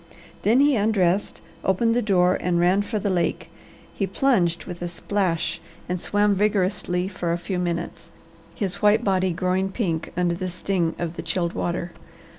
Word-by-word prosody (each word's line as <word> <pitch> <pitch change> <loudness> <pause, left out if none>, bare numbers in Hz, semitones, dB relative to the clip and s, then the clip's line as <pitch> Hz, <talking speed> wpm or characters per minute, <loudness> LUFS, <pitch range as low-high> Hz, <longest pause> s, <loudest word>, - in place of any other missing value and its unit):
Then 230 +6 +4
he 285 -1 +4
undressed, 200 -3 +1 0.2
opened 230 +5 +2
the 245 - +2
door, 185 -4 +3
and 175 -1 +1
ran 180 +3 +3
for 215 +2 -3
the 200 -1 -1
lake. 175 -2 -1 0.4
He 195 - -1
plunged 185 -6 +1
with 175 -1 -8
a 175 - -2
splash 175 -1 -1 0.3
and 180 0 -2
swam 205 0 +2
vigorously 190 -3 0
for 180 -3 -3
a 170 - +1
few 180 +1 -3
minutes, 170 -1 -3 0.5
his 200 -1 -2
white 210 +2 +4
body 190 -2 +2
growing 185 +2 0
pink 175 -6 -2
under 175 -1 +2
the 185 +2 -3
sting 175 -1 -1
of 170 -1 -4
the - - -3
chilled 170 +1 -1
water. 175 0 -2
185 Hz, 170 wpm, -24 LUFS, 175-205 Hz, 0.5 s, Then